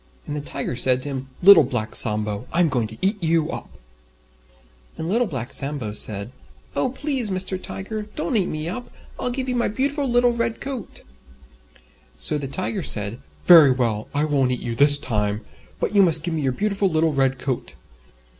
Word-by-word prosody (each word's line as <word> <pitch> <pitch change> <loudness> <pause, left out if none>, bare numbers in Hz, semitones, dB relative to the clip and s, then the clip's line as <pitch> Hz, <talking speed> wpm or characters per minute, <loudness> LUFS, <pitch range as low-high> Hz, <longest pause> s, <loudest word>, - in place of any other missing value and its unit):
And 150 - -5
the 150 - -3
Tiger 135 - -4
said 130 +1 +4
to 145 - -4
him, 135 -1 -6
"Little 195 -4 +9
Black 120 -4 -4
Sambo, 105 +1 +2
I'm 170 0 +2
going 120 -5 -1
to 110 +1 -12
eat 200 +1 0
you 165 -1 +1
up!" - - -7 1.3
And 160 - -5
Little 230 +6 +1
Black 130 - -5
Sambo 135 -7 -2
said, 105 +1 -1 0.4
"Oh! 145 - 0
Please, 265 -3 -2
Mr. 185 0 0
Tiger, 210 +2 -6
don't 300 -4 -2
eat 195 -5 +2
me 155 +1 -4
up, 245 +8 -5
and - - -23 0.3
I'll - - -2
give 260 +1 -3
you 250 - -1
my 240 - +1
beautiful 275 +4 -1
little 245 0 +3
Red 230 -1 -2
Coat." 270 -4 -6 1.1
So - - +2
the 140 - -5
Tiger 185 +7 -2
said, 105 - +2 0.3
"Very 165 -5 +8
well, 115 -4 -1
I 145 +2 0
won't 140 -4 +1
eat 125 - -3
you 120 - -4
this 145 +4 +5
time, 105 -5 -2 0.3
but - - -2
you 200 - +5
must 165 -4 +5
give 170 - -2
me 160 - -2
your 135 -2 0
beautiful 200 +2 0
little 160 -1 +1
Red 135 -1 +1
Coat." 130 -1 -4
155 Hz, 190 wpm, -22 LUFS, 125-205 Hz, 1.3 s, Little